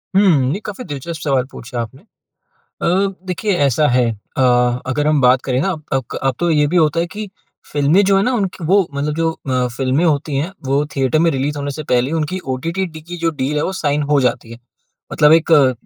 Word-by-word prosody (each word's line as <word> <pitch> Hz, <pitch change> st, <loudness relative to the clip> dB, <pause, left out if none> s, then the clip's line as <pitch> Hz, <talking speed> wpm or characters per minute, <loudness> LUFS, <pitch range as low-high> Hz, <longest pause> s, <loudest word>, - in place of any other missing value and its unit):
हुँ। 155 Hz, -9 st, +4 dB
ये 200 Hz, -, -3 dB
काफ़ी 210 Hz, +5 st, -6 dB
दिलचस्प 155 Hz, +2 st, -6 dB
सवाल 135 Hz, -4 st, +1 dB
पूछा 120 Hz, 0 st, -7 dB
आपने। 130 Hz, +6 st, -8 dB, 0.6 s
अ, -, -, -7 dB, 0.4 s
देखिए 195 Hz, +3 st, -1 dB
ऐसा 145 Hz, +3 st, +2 dB
है 125 Hz, -1 st, +2 dB, 0.3 s
अ, 130 Hz, -, +2 dB, 0.4 s
अगर 145 Hz, +3 st, -1 dB
हम 150 Hz, -2 st, +3 dB
बात 125 Hz, 0 st, +4 dB
करे 130 Hz, -2 st, 0 dB
हाँ, 190 Hz, +3 st, 0 dB, 0.2 s
अक 130 Hz, -3 st, -2 dB
अब 135 Hz, -2 st, +1 dB
तो 175 Hz, -, 0 dB
ये 150 Hz, -2 st, +3 dB
भी 180 Hz, -, -1 dB
होता 160 Hz, 0 st, +3 dB
है 170 Hz, -, 0 dB
कि 205 Hz, +4 st, -7 dB, 0.4 s
फिल्में 150 Hz, +7 st, +3 dB
जो 195 Hz, 0 st, +3 dB
है 195 Hz, -, +3 dB
ना 250 Hz, -, +1 dB
उनकी 190 Hz, -6 st, -2 dB
वो 190 Hz, +1 st, +3 dB
मतलब 145 Hz, +2 st, -2 dB
जो 165 Hz, 0 st, +1 dB, 0.2 s
अ, 125 Hz, -1 st, +1 dB
फिल्में 135 Hz, +5 st, +1 dB
होती 150 Hz, -2 st, 0 dB
हैं 155 Hz, +6 st, -1 dB, 0.2 s
वो 140 Hz, +2 st, +1 dB
थिएटर 135 Hz, +3 st, +2 dB
में -, -, +4 dB
रिलीज 140 Hz, +2 st, -2 dB
होने 145 Hz, 0 st, -3 dB
से 155 Hz, +3 st, -5 dB
पहले, 125 Hz, +1 st, 0 dB
उनकी 165 Hz, +3 st, -1 dB, 0.2 s
ओटीटी 170 Hz, +8 st, -2 dB
डी 160 Hz, -2 st, -10 dB
की 175 Hz, +3 st, -8 dB
जो 165 Hz, -1 st, 0 dB
डील 145 Hz, +3 st, -1 dB
है, 150 Hz, -, +1 dB
वो 190 Hz, -, -2 dB
साइन 150 Hz, -5 st, 0 dB
हो 145 Hz, -2 st, +4 dB
जाती 120 Hz, -2 st, -1 dB
है। 115 Hz, -, -10 dB, 0.5 s
मतलब 150 Hz, +1 st, +5 dB
एक 165 Hz, 0 st, +3 dB
अ 140 Hz, -4 st, +6 dB
150 Hz, 225 wpm, -18 LUFS, 135-170 Hz, 0.6 s, अ